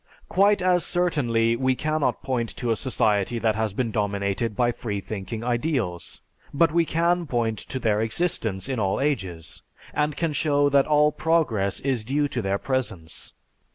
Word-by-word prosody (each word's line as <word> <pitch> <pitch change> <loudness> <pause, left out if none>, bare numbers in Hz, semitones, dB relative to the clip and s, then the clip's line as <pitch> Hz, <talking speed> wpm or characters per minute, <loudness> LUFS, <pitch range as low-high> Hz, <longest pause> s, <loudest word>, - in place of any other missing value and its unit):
Quite 200 0 +3
as 180 -1 +3
certainly 120 -10 +1
we 130 +2 +1
cannot 155 +1 -1
point 120 -3 -1
to 120 -2 -1
a - - +3
society 110 -2 +1
that 110 -1 +1
has 110 0 -1
been 115 +1 -1
dominated 100 +1 -1
by 120 +1 +2
Freethinking 110 -1 -5
ideals, 120 - -2 0.3
but 165 +2 +3
we 170 +1 +3
can 170 +1 +1
point 115 -4 -1
to 130 - -6
their 110 -4 +1
existence 110 - -1
in 130 -3 -2
all 95 -2 0
ages, 95 - -2 0.3
and 150 -1 0
can 165 -3 0
show 145 -1 +2
that 140 -1 +3
all 150 0 +4
progress 125 -14 +1
is 130 -5 -1
due 145 +5 0
to 125 - -2
their 95 -1 0
presence. 110 -11 -3
120 Hz, 160 wpm, -25 LUFS, 110-150 Hz, 0.3 s, all